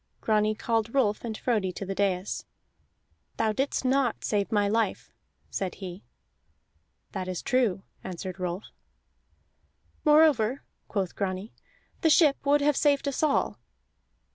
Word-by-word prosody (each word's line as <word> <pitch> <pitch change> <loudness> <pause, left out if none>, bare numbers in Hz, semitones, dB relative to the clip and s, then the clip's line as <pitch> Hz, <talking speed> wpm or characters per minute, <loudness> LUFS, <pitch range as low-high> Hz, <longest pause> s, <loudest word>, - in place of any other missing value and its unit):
Grani 215 0 +2
called 225 +2 -1
Rolf 210 -6 +2
and 225 -2 -4
Frodi 210 -7 0
to 195 - -5
the 195 - -3
dais. 190 -1 -1 0.9
"Thou 220 -1 +2
didst 270 +4 -1
not 260 -2 +1
save 205 -2 0
my 205 -2 +3
life," 220 -1 -1 0.4
said 190 -2 -3
he. 185 -1 -8 1.1
"That 185 -3 -4
is 185 -2 -4
true," 235 -7 +1 0.2
answered 185 0 -6
Rolf. 180 +2 -3 1.4
"Moreover," 295 -6 +4 0.2
quoth 195 -4 -2
Grani, 190 +2 -3 0.5
"the 325 - +4
ship 300 -3 +5
would 290 +1 +4
have 295 0 +3
saved 285 0 +2
us 280 - -1
all." 305 -2 +1
215 Hz, 130 wpm, -28 LUFS, 195-270 Hz, 1.4 s, ship